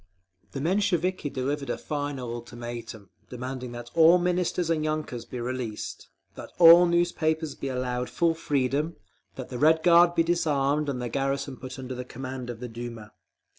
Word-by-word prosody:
_ - - -36
The 135 - -4
Mensheviki 185 -2 0
delivered 140 +2 -3
a - - -1
final 145 -5 -4
ultimatum, 120 -4 -8 0.2
demanding 125 0 -6
that 120 0 -8
all 165 +2 +7
Ministers 180 -1 0
and 155 -2 0
yunkers 155 -6 -3
be 125 - -5
released, 120 -3 -5 0.2
that - - -9
all 170 +1 +9
newspapers 160 -3 0
be 140 - -6
allowed 125 -1 -2
full 170 -1 +1
freedom, 145 +1 -1 0.4
that 130 - -7
the 125 - -5
Red 160 +2 +4
Guard 175 0 +6
be 165 - +4
disarmed 150 -3 +1
and 130 -3 -2
the 125 - -3
garrison 135 +2 -2
put 130 +1 -9
under 130 -1 -5
command 130 0 -7
of 120 -2 -6
the 125 - -5
Duma. 115 -2 -8
135 Hz, 165 wpm, -27 LUFS, 125-165 Hz, 0.4 s, all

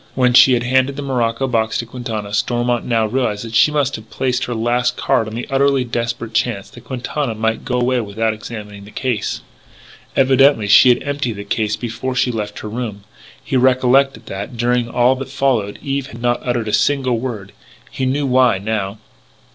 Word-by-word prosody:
When 125 -1 +3
she 130 +1 +7
had 120 -1 +1
handed 130 +2 +2
the 145 - -5
morocco 125 -2 0
box 110 -3 0
to 115 - -3
Quintana, 115 -4 -5
Stormont 120 +2 0
now 115 -2 +1
realised 115 -2 -1
that 115 - -8
she 110 +7 +5
must 145 -2 0
have 110 0 -14
played 125 +2 -1
her 120 - -4
last 120 +2 0
card 110 - +1
on 110 - -7
the 120 - -4
utterly 135 -1 +2
desperate 115 -1 -3
chance 110 -2 -1
that - - -14
Quintana 130 -1 -3
might 110 +1 -1
go 125 -1 -1
away 125 0 +1
without 110 +1 -1
examining 105 -2 -9
the - - -12
case. 120 -3 -2 0.7
Evidently 135 -4 +4
she 105 +5 +7
had 120 - +3
emptied 140 -4 -2
the 100 -1 -7
case 105 +1 -1
before 120 +2 -4
she 125 0 +1
left 105 -2 -5
her - - -6
room. 105 -2 -5 0.4
He - - -3
recollected 130 +1 +3
that, 100 +6 -6
during 120 0 +1
all 125 +2 +3
that 135 0 -6
followed, 130 -7 0
Eve 140 -1 -2
had 115 -3 -11
not 120 0 0
uttered 120 -3 -1
a - - -3
single 130 +1 +2
word. 110 -6 -5 0.4
He 130 - -2
knew 140 +2 0
why, 130 -4 +3
now. 100 0 -3
120 Hz, 195 wpm, -18 LUFS, 110-130 Hz, 0.7 s, she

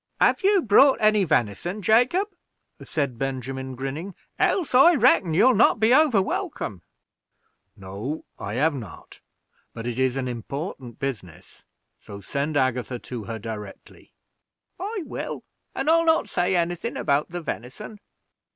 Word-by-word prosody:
"Have - - +3
you 395 -2 +4
brought 260 +6 +6
any 215 -2 +3
venison, 155 - -1
Jacob?" 250 - +3 0.6
said 140 -6 -3
Benjamin, 130 0 -4
grinning, 140 +9 -5 0.2
"else, 345 -9 +1
I 280 +7 +7
reckon, 215 - +3
you'll 255 +9 +5
not 215 - +4
be 220 +3 +4
over 265 -9 +4
welcome." 190 - -4 0.9
"No, 100 +11 -6
I 100 +2 -5
have 155 +5 +2
not; 115 - -10 0.5
but 115 - -6
it 120 +1 -3
is 130 -1 +1
an 135 -1 -2
important 125 - -6
business, 115 - -7 0.3
so 100 - -10
send 140 +9 -2
Agatha 130 -2 0
to 120 -2 -7
her 115 +1 -5
directly." 105 -2 -9 0.7
"I 400 +1 -4
will; - - -6 0.3
and 270 - -3
I'll 330 +1 +5
not 320 0 +3
say 180 +1 0
any 175 0 +1
thing 205 +7 -5
about 140 +2 0
the 175 0 -5
venison." 160 - -7
150 Hz, 140 wpm, -24 LUFS, -, 0.9 s, I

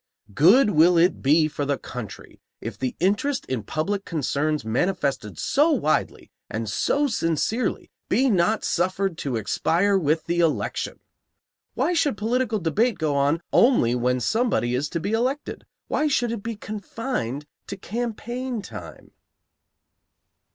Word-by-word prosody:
Good 205 - +6
will 170 +2 +5
it 175 +2 +3
be 155 +3 +4
for 145 -1 -4
the 140 -1 0
country 125 -5 -9 0.2
if - - -6
the 130 -1 -3
interest 205 - 0
in 130 -3 -3
public 190 - -2
concerns 150 - -1
manifested 125 - -1
so 295 +4 +2
widely 240 - 0 0.2
and 110 +1 -3
so 285 - +1
sincerely 215 - -1 0.2
be 255 +7 +3
not 210 0 +2
suffered 185 +1 0
to 135 -4 -2
expire 175 - +1
with 160 -1 0
the 175 0 -1
election! 165 -2 -1 0.7
Why 355 - +1
should 295 -9 +1
political 230 +1 0
debate 205 - +1
go 155 -3 0
on 145 +4 +1
only 235 - +4
when 125 +1 +1
somebody 220 - +1
is 140 +4 -1
to 170 - -2
be 195 +5 -3
elected? 255 +6 -2 0.2
Why 305 - +1
should 245 -5 +1
it 230 -3 -4
be 230 +2 -4
confined 205 - -4 0.2
to 200 - -6
campaign 240 +2 -4
time? - - -10
180 Hz, 140 wpm, -24 LUFS, 145-230 Hz, 0.7 s, Good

